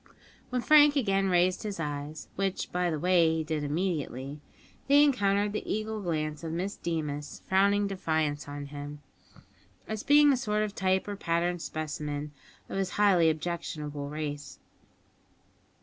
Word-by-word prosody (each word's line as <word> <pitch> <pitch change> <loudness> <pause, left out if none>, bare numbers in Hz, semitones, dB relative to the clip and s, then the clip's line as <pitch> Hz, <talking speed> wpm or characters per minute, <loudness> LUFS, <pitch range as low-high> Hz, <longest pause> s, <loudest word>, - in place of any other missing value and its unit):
When 250 -1 -1
Frank 295 -1 +7
again 195 -7 +2
raised 180 0 +2
his 205 -4 -5
eyes 150 0 -5
which, 195 -1 -2
by 180 0 0
the 160 - -1
way, 170 0 +3
he 160 - -1
did 155 -1 -2
immediately 145 -4 -3 0.5
they 285 +1 +7
encountered 205 -7 +2
the 215 - -3
eagle 215 0 -2
glance 155 -3 -2
of 165 - -4
Miss 190 +4 -2
Deemas 150 -3 -4
frowning 200 +2 +3
defiance 160 -7 -1
on 145 0 -6
him, 145 0 -7 0.8
as 220 -1 -3
being 290 0 +6
a - - +1
sort 215 -4 0
of 210 -2 -3
type 190 0 +1
or 205 - -3
pattern 175 -1 0
specimen 150 -2 -4 0.4
of 195 - -3
his 190 -1 0
highly 190 -6 +5
objectionable 155 -3 -4
race. 145 -2 -5
175 Hz, 150 wpm, -29 LUFS, 150-200 Hz, 0.8 s, Frank